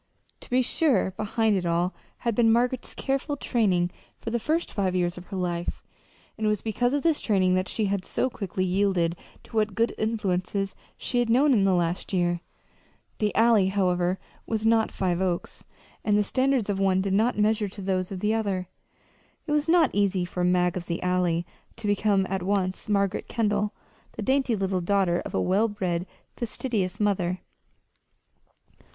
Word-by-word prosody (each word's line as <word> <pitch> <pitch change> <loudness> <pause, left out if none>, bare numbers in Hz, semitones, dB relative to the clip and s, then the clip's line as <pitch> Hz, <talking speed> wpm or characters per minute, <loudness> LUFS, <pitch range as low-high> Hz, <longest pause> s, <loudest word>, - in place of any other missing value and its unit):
To - - -15
be 255 +1 +3
sure, 245 - +2
behind 215 +2 0
it 185 - 0
all 170 +1 0 0.3
had 235 -2 0
been 225 +1 +4
Margaret's 245 +2 0
careful 275 +2 -2
training 185 -10 +1 0.3
for 225 - -5
the 235 - 0
first 320 +8 -1
five 190 -3 0
years 175 -1 0
of 180 0 -10
her 195 - -5
life, 175 -1 -3 0.6
and 215 - +1
it - - +4
was 210 -2 -1
because 245 +3 0
of 290 - 0
this 325 -3 +2
training 190 -4 +2
that 185 +1 +1
she 220 - 0
had 200 -1 -1
so 255 - 0
quickly 190 -6 -3
yielded 185 -3 +1 0.3
to - - -13
what 215 -2 +1
good 230 +2 +1
influences 195 -3 -1 0.2
she 245 - -1
had 240 -1 +1
known 270 +5 +5
in 200 -5 +3
the 190 -1 +3
last 175 +2 -1
year. 175 -2 +1 0.8
The 210 -1 +1
Alley, 225 -4 +5
however, 180 -2 +1 0.3
was 220 -1 -1
not 225 0 +3
Five 180 -2 -1
Oaks; 180 -2 -2 0.4
and 210 -1 +3
the 210 - +3
standards 260 +1 +1
of 200 -2 -1
one 190 -1 +3
did 195 0 -1
not 220 +4 +2
measure 210 0 +2
to 200 +1 -8
those 185 -1 -1
of 185 -2 -5
the 210 +1 +2
other. 195 -5 -1 0.8
It 300 - -4
was 300 +1 +2
not 330 -5 +5
easy 195 -3 +1
for 180 0 -3
"Mag 180 0 +2
of 175 -2 -5
the 170 0 -3
Alley" 180 -2 +1 0.3
to 230 - -9
become 205 -1 +2
at 190 0 -2
once 190 +1 -1
Margaret 200 -1 0
Kendall, 210 -2 0 0.4
the - - -5
dainty 265 -3 +2
little 190 -2 -1
daughter 180 -1 +2
of - - -6
a - - +2
well 200 +5 +2
bred, 185 -4 -2 0.3
fastidious 220 -5 -2
mother. 185 -3 0
200 Hz, 180 wpm, -26 LUFS, 185-225 Hz, 0.8 s, known